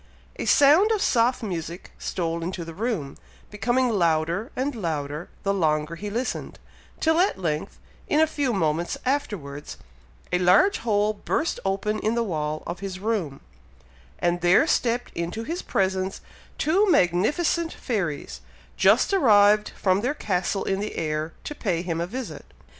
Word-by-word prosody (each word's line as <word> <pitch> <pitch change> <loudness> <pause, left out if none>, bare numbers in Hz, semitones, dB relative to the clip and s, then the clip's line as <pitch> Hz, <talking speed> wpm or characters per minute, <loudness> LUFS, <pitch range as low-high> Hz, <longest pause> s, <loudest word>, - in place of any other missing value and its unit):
A - - -3
sound 305 +9 +6
of 435 - +2
soft 245 -5 +2
music 175 -3 -5
stole 170 -1 -2
into 170 0 -4
the 165 - -8
room, 195 - -3 0.3
becoming 240 +5 +1
louder 170 - +1
and 275 +3 -1
louder 155 - -4
the 200 - +1
longer 155 -3 0
he 205 +5 -6
listened, 240 +5 -3 0.4
till 320 +1 +2
at 380 +3 +2
length, 155 -5 -3 0.3
in 300 - +2
a 315 - +6
few 290 -4 -1
moments 170 -4 0
afterwards, 185 - -3 0.6
a 180 - +3
large 185 - +4
hole 210 -2 +1
burst 305 +9 -2
open 200 +2 -1
in 220 +2 0
the 235 - +1
wall 155 -6 -3
of 175 +1 -5
his 195 -1 -5
room, 190 -10 -2 0.8
and 175 0 0
there 180 - +5
stepped 245 -5 0
into 170 +7 -4
his 335 +9 -4
presence, 190 0 -1 0.4
two 385 +7 +2
magnificent 300 - +2
fairies, 180 - -3 0.3
just - - +4
arrived 210 - +5
from 190 0 +1
their 255 +6 -1
castle 195 -2 -1
in 195 0 -1
the 210 +1 -4
air, 155 0 -2
to - - -5
pay 180 - -2
him 170 -2 -2
a 170 - -2
visit. 250 +5 -6
200 Hz, 155 wpm, -25 LUFS, 170-245 Hz, 0.8 s, sound